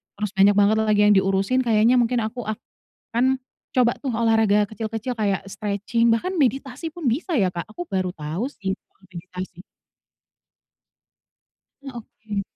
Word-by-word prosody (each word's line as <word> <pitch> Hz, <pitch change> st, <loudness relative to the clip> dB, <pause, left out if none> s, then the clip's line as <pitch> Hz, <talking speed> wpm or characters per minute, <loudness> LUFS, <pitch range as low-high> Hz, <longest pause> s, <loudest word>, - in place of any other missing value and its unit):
terus 210 Hz, -1 st, -3 dB
banyak 195 Hz, +1 st, +5 dB
banget 205 Hz, +2 st, +4 dB
lagi 215 Hz, -1 st, +2 dB
yang -, -, +6 dB
diurusin, 195 Hz, +5 st, +2 dB
kayaknya 230 Hz, +1 st, +4 dB
mungkin 240 Hz, 0 st, +2 dB
aku 240 Hz, +3 st, -4 dB
akan 235 Hz, +3 st, -3 dB, 0.4 s
coba 245 Hz, -2 st, +4 dB
tuh 270 Hz, -, -1 dB
olahraga 220 Hz, -2 st, +3 dB
kecil-kecil 225 Hz, +3 st, -4 dB
kayak 200 Hz, -3 st, 0 dB
stretching 205 Hz, +3 st, 0 dB
bahkan 365 Hz, +12 st, -1 dB
meditasi 270 Hz, +3 st, 0 dB
pun 340 Hz, -4 st, -7 dB
bisa 310 Hz, -, 0 dB
ya 190 Hz, -, +3 dB
Kak? 170 Hz, -, -4 dB
aku 285 Hz, -, -5 dB
baru 185 Hz, -1 st, -1 dB
tau 155 Hz, +6 st, -4 dB
sih 195 Hz, -8 st, -4 dB, 0.2 s
kalo -, -, -36 dB
meditasi. 180 Hz, 0 st, -8 dB, 2.2 s
Nah, 270 Hz, -3 st, -8 dB
oke. 215 Hz, -2 st, -6 dB
220 Hz, 145 wpm, -23 LUFS, 195-245 Hz, 2.2 s, yang